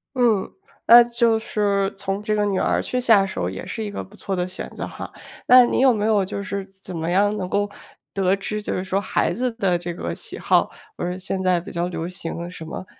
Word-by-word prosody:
嗯， 235 -6 +2 0.4
那 240 +1 +10
就 235 -1 +2
是 200 -3 0
从 195 +1 -3
这 215 0 -1
个 210 0 +1
女 195 -2 0
儿 - - +1
去 250 - -2
下 220 -5 +5
手 90 - -3
也 95 - -7
是 220 - -5
一 210 - -4
个 205 - -5
不 200 - -16
错 195 -2 -3
的 180 0 -1
选 185 - -6
择 - - -4
哈。 - - -8 0.4
那 250 0 +9
你 - - 0
有 260 0 +6
没 210 -3 -1
有 215 -3 +3
就 200 +1 -4
是 200 +1 -4
怎 190 -2 -10
么 165 +1 -2
样 205 +3 +2
能 185 -2 -4
够， 205 0 +1 0.5
得 195 0 +2
知 210 +2 -4
就 - - -3
是 185 - -2
说 190 +1 -1
孩 205 - 0
子 250 0 -1
的 195 -6 +1
这 175 0 -5
个 - - -4
喜 - - -5
好？ - - +2 0.3
不 - - -6
是 180 +1 -2
现 190 0 -3
在 180 -2 +3
比 185 - -9
较 170 +1 -1
流 170 -1 -4
行 175 -1 -5
什 175 - -9
么？ 160 +3 -7
195 Hz, 260 characters per minute, -22 LUFS, 185-215 Hz, 0.5 s, 那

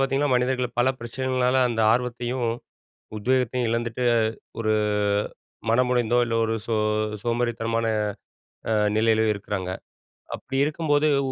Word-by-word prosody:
பார்த்தீங்கன்னா, 135 0 +1
மனிதர்கள் 125 -1 0
பல 130 - +3
பிரச்சனைகள்னால 130 +1 0
அந்த 115 -1 -1
ஆர்வத்தையும், 125 0 -1 0.7
உத்வேகத்தையும் 125 +1 +1
இழந்துட்டு, 115 +1 -2 0.6
ஒரு 110 -1 +1 1.0
மனமுடைந்தோ, 120 0 +2
இல்ல 115 - -2
ஒரு 115 0 -1
சோ 115 - 0 0.5
சோம்பேறித்தனமான 115 -1 -1 0.9
அ - - +2 0.2
நிலையிலயோ 110 -1 +3
இருக்கிறாங்க. 95 -2 -4 0.7
அப்பிடி 135 +2 -5
இருக்கும்போது 150 0 +1 0.2
உ - - -2
120 Hz, 105 wpm, -24 LUFS, 115-130 Hz, 1.0 s, பல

